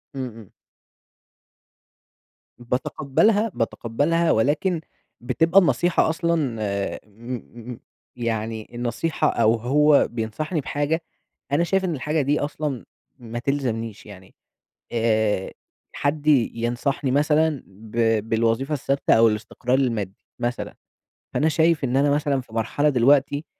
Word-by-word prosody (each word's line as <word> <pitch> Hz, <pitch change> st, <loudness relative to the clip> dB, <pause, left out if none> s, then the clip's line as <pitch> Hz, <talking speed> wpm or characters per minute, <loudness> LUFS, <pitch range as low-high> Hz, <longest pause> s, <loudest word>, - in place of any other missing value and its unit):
إمم، 135 Hz, -1 st, -3 dB
إمم. 110 Hz, -4 st, -12 dB, 2.1 s
باتقبَّلها، 140 Hz, -, +1 dB
باتقبَّلها، 145 Hz, +9 st, 0 dB
ولكن 155 Hz, -, +1 dB, 0.4 s
بتبقى 165 Hz, +10 st, +3 dB
النصيحة 175 Hz, -2 st, +2 dB
أصلًا 160 Hz, -7 st, 0 dB
آآ، 100 Hz, -1 st, -2 dB
م 115 Hz, +4 st, -7 dB, 0.4 s
م 115 Hz, -, -9 dB, 0.4 s
يعني 110 Hz, -2 st, -3 dB
النصيحة 120 Hz, +7 st, -1 dB
أو 115 Hz, -1 st, +3 dB
هو 145 Hz, +5 st, +4 dB
بينصَحني 125 Hz, +9 st, -3 dB
بحاجة 145 Hz, +4 st, -1 dB, 0.5 s
أنا 155 Hz, +4 st, +3 dB
شايِف 190 Hz, +2 st, +1 dB
إن 170 Hz, -4 st, -1 dB
الحاجة 150 Hz, +4 st, -1 dB
دي 145 Hz, +2 st, +1 dB
أصلًا 145 Hz, -, -3 dB, 0.3 s
ما 120 Hz, 0 st, -6 dB
تلزَمنيش، 120 Hz, -5 st, -3 dB
يعني، 95 Hz, -2 st, -13 dB, 0.6 s
آآ، 110 Hz, -4 st, +1 dB, 0.4 s
حد 145 Hz, +1 st, -2 dB
ي 135 Hz, -6 st, +4 dB
ينصَحني 125 Hz, +4 st, -1 dB
مثلًا 150 Hz, +1 st, +2 dB
با 110 Hz, +2 st, -1 dB
بالوظيفة 115 Hz, +6 st, 0 dB
الثابِتة 140 Hz, 0 st, +1 dB
أو 115 Hz, 0 st, +6 dB
الاستقرار 115 Hz, +4 st, -1 dB
المادي 110 Hz, -8 st, -1 dB, 0.2 s
مثلًا، 120 Hz, 0 st, -3 dB, 0.6 s
فأنا 155 Hz, -, +2 dB
شايِف 160 Hz, -1 st, +2 dB
إن 130 Hz, 0 st, +1 dB
أنا 145 Hz, +1 st, +3 dB
مثلًا 145 Hz, -2 st, +1 dB
في 115 Hz, -, -18 dB
مرحلة 115 Hz, +6 st, +1 dB
دلوقتي 140 Hz, +3 st, +3 dB
130 Hz, 115 wpm, -23 LUFS, 115-150 Hz, 2.1 s, أو